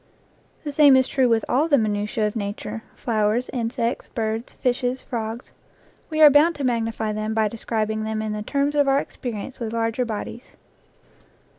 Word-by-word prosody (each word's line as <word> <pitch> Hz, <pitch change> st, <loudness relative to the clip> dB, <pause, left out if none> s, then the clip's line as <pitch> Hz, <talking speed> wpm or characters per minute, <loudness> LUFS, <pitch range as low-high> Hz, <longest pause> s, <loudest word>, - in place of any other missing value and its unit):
The 295 Hz, -, -4 dB
same 285 Hz, -2 st, +6 dB
is 260 Hz, -1 st, +4 dB
true 255 Hz, -3 st, +2 dB
of 225 Hz, -1 st, +2 dB
all 290 Hz, +6 st, +2 dB
the 290 Hz, -3 st, +4 dB
minutiae 210 Hz, -1 st, 0 dB
of 210 Hz, -, -2 dB
nature 205 Hz, +1 st, -4 dB
flowers, 220 Hz, +1 st, 0 dB
insects, 230 Hz, -1 st, -2 dB
birds, 225 Hz, 0 st, -3 dB
fishes, 250 Hz, 0 st, -1 dB
frogs. 230 Hz, 0 st, -5 dB, 0.6 s
We 315 Hz, -1 st, -1 dB
are 300 Hz, -2 st, +10 dB
bound 310 Hz, +4 st, +5 dB
to 285 Hz, -, -5 dB
magnify 225 Hz, -3 st, -1 dB
them 215 Hz, +1 st, -3 dB
by 220 Hz, -1 st, +3 dB
describing 220 Hz, -1 st, -2 dB
them 220 Hz, 0 st, -2 dB
in 215 Hz, -1 st, -2 dB
the 210 Hz, -, -4 dB
terms 280 Hz, +6 st, 0 dB
of 290 Hz, -1 st, +3 dB
our 270 Hz, 0 st, +4 dB
experience 245 Hz, -3 st, -5 dB
with 225 Hz, -2 st, -4 dB
larger 230 Hz, +2 st, 0 dB
bodies. 230 Hz, +1 st, -6 dB
230 Hz, 170 wpm, -23 LUFS, 220-260 Hz, 0.6 s, are